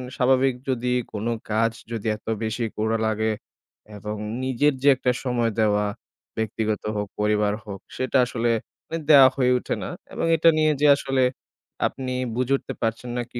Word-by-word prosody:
স্বাভাবিক 130 Hz, +1 st, +3 dB, 0.2 s
যদি 125 Hz, -1 st, 0 dB, 0.2 s
কোন 105 Hz, 0 st, -4 dB, 0.3 s
কাজ 115 Hz, +1 st, +2 dB, 0.2 s
যদি 115 Hz, -1 st, -3 dB
এত 105 Hz, -, -17 dB, 0.2 s
বেশি 110 Hz, +2 st, -2 dB
করা 110 Hz, +1 st, +1 dB
লাগে, 110 Hz, 0 st, 0 dB, 0.7 s
এবং 105 Hz, +1 st, -5 dB, 0.3 s
নিজের 130 Hz, +3 st, +2 dB
যে -, -, +3 dB
একটা 125 Hz, 0 st, +1 dB
সময় 120 Hz, -3 st, 0 dB
দেওয়া, 105 Hz, -1 st, +2 dB, 0.5 s
ব্যক্তিগত 110 Hz, -1 st, -2 dB
হোক 105 Hz, 0 st, -2 dB
পরিবার 105 Hz, 0 st, +2 dB
হোক 100 Hz, -2 st, -7 dB, 0.2 s
সেটা 130 Hz, +1 st, +1 dB
আসলে 120 Hz, -1 st, -1 dB, 0.4 s
মানে 165 Hz, +1 st, -3 dB
দেয়া 135 Hz, -3 st, +9 dB
হয়ে 125 Hz, -2 st, +2 dB
ওঠে -, -, -3 dB
না, -, -, -4 dB, 0.2 s
এবং -, -, -2 dB
এটা 165 Hz, +1 st, +5 dB
নিয়ে 155 Hz, 0 st, +4 dB
যে 150 Hz, -, +5 dB
আসলে 135 Hz, -2 st, 0 dB, 0.6 s
আপনি 130 Hz, -1 st, -6 dB, 0.2 s
বুঝে 125 Hz, +2 st, 0 dB
উঠতে -, -, -7 dB
পারছেন 115 Hz, +2 st, -2 dB
না -, -, 0 dB
কি 120 Hz, -, -5 dB
120 Hz, 165 wpm, -24 LUFS, 110-130 Hz, 0.7 s, দেয়া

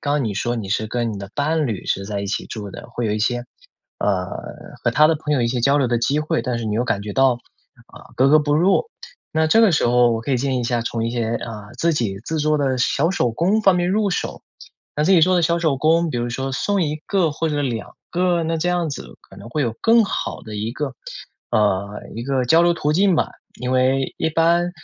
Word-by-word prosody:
刚 145 Hz, -1 st, 0 dB
你 105 Hz, -3 st, -2 dB
说 120 Hz, +5 st, -1 dB
你 105 Hz, -5 st, -5 dB
是 110 Hz, +2 st, 0 dB
跟 120 Hz, 0 st, -2 dB
你 100 Hz, -, -6 dB
的 100 Hz, 0 st, -8 dB
伴 150 Hz, +1 st, 0 dB
侣 110 Hz, -6 st, -4 dB
是 95 Hz, -, -1 dB
在 105 Hz, -1 st, -3 dB
一 100 Hz, -, -4 dB
起 -, -, -3 dB
住 105 Hz, -3 st, -7 dB
的， -, -, -10 dB
会 120 Hz, -2 st, -3 dB
有 105 Hz, -, 0 dB
一 105 Hz, -, -1 dB
些， 120 Hz, +2 st, 0 dB, 0.5 s
呃 95 Hz, -3 st, 0 dB, 0.6 s
和 -, -, +2 dB
他 155 Hz, -, +5 dB
的 165 Hz, -, +3 dB
朋 150 Hz, 0 st, -3 dB
友 130 Hz, -, +1 dB
一 -, -, +2 dB
些 125 Hz, 0 st, -1 dB
交 140 Hz, +4 st, +3 dB
流 135 Hz, -, +2 dB
的 120 Hz, -1 st, +1 dB
机 140 Hz, +6 st, +1 dB
会， 155 Hz, +1 st, -1 dB
但 125 Hz, -3 st, -2 dB
是 115 Hz, -, -4 dB
你 105 Hz, -, -1 dB
又 120 Hz, +3 st, +1 dB
感 115 Hz, -4 st, -1 dB
觉 105 Hz, -1 st, -5 dB
到， 135 Hz, -1 st, +4 dB, 0.5 s
啊， -, -, -15 dB
格 130 Hz, +2 st, +4 dB
格 155 Hz, -, +6 dB
不 145 Hz, -1 st, +1 dB
入。 185 Hz, -, +3 dB, 0.5 s
那 160 Hz, 0 st, +2 dB
这 225 Hz, +8 st, +4 dB
个 205 Hz, -6 st, +5 dB
时 145 Hz, -, +2 dB
候 120 Hz, 0 st, +4 dB
我 115 Hz, -, -1 dB
可 120 Hz, -, -5 dB
以 130 Hz, -, +3 dB
建 135 Hz, +1 st, -1 dB
议 -, -, 0 dB
一 -, -, -3 dB
下， 120 Hz, 0 st, 0 dB
从 115 Hz, -1 st, -2 dB
一 -, -, -2 dB
些， 115 Hz, -1 st, -1 dB
啊， 105 Hz, -3 st, -7 dB
自 170 Hz, 0 st, +2 dB
己 105 Hz, -9 st, -1 dB
制 160 Hz, -, -2 dB
作 150 Hz, 0 st, +1 dB
的 135 Hz, -2 st, +1 dB
小 140 Hz, +6 st, +1 dB
手 125 Hz, -11 st, +1 dB
工 185 Hz, -, +1 dB
方 195 Hz, -2 st, +5 dB
面 175 Hz, 0 st, +1 dB
入 205 Hz, 0 st, +1 dB
手。 -, -, -3 dB, 0.5 s
那 150 Hz, -, +1 dB
自 190 Hz, -, +2 dB
己 175 Hz, -, +6 dB
做 185 Hz, +3 st, +4 dB
的 175 Hz, -, +2 dB
小 170 Hz, +1 st, +2 dB
手 160 Hz, -5 st, +1 dB
工， 165 Hz, +4 st, +2 dB
比 120 Hz, -, -3 dB
如 120 Hz, 0 st, -2 dB
说 135 Hz, +2 st, -3 dB
送 200 Hz, +8 st, 0 dB
1 150 Hz, -1 st, -1 dB
个 180 Hz, -6 st, +1 dB
或 160 Hz, +2 st, -2 dB
者 145 Hz, -1 st, -1 dB
2 115 Hz, -5 st, -3 dB, 0.2 s
个， 175 Hz, -1 st, +1 dB
那 165 Hz, 0 st, -1 dB
这 175 Hz, +3 st, -1 dB
样 175 Hz, -3 st, 0 dB
子 -, -, -8 dB
可 -, -, -15 dB
能 115 Hz, -, -10 dB
会 150 Hz, +5 st, -2 dB
有 115 Hz, -2 st, -1 dB
更 230 Hz, -1 st, +5 dB
好 -, -, -4 dB
的 110 Hz, -1 st, -8 dB
一 105 Hz, +2 st, -3 dB
个， 140 Hz, -1 st, -3 dB, 0.6 s
呃， 100 Hz, -1 st, 0 dB
一 115 Hz, -, -5 dB
个 130 Hz, -1 st, 0 dB
交 160 Hz, +7 st, +5 dB
流 175 Hz, 0 st, +3 dB
途 150 Hz, -2 st, 0 dB
径 190 Hz, 0 st, +3 dB
吧。 -, -, 0 dB, 0.3 s
因 125 Hz, +1 st, -2 dB
为 130 Hz, +1 st, +1 dB
一 160 Hz, -, 0 dB
般， 170 Hz, +2 st, +2 dB
135 Hz, 275 characters per minute, -21 LUFS, 115-165 Hz, 0.6 s, 格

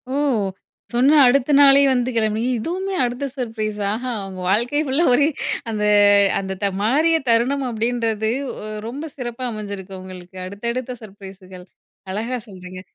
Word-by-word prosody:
ஓ! -, -, -3 dB, 0.8 s
சொன்ன 265 Hz, +6 st, +4 dB
அடுத்த 265 Hz, +3 st, +3 dB
நாளே 280 Hz, -1 st, +7 dB
வந்து 250 Hz, -1 st, +1 dB
கெளம்பி 220 Hz, -1 st, +1 dB, 0.2 s
இதுவுமே 375 Hz, -, -3 dB
அடுத்த 245 Hz, +3 st, -2 dB
சர்ப்ரைஸ். 220 Hz, -4 st, -3 dB
ஆஹா! 250 Hz, +4 st, -3 dB, 0.2 s
உங்க 190 Hz, -1 st, -9 dB
வாழ்க்கை 240 Hz, +9 st, +1 dB
ஃபுல்லா 285 Hz, +5 st, +1 dB
ஒரே 285 Hz, +4 st, +4 dB, 0.4 s
அந்த, 215 Hz, -2 st, -2 dB, 0.6 s
அந்த 190 Hz, -1 st, -4 dB
த 200 Hz, -, +2 dB
"மாறிய 305 Hz, +10 st, +3 dB
தருணம்" 255 Hz, +4 st, +2 dB
அப்படீன்றது 225 Hz, -1 st, -1 dB, 0.3 s
ஒ -, -, -8 dB, 0.2 s
ரொம்ப 285 Hz, +7 st, -6 dB
சிறப்பா 245 Hz, 0 st, -5 dB
அமஞ்சிருக்கு 200 Hz, -3 st, -7 dB
உங்களுக்கு. 185 Hz, 0 st, -11 dB
அடுத்தடுத்த 235 Hz, +6 st, -4 dB
சர்ப்ரைஸுகள். 190 Hz, -3 st, -12 dB, 0.5 s
அழகா 230 Hz, +6 st, -3 dB
சொல்றீங்க. 185 Hz, -2 st, -10 dB
230 Hz, 135 wpm, -21 LUFS, 200-255 Hz, 0.8 s, நாளே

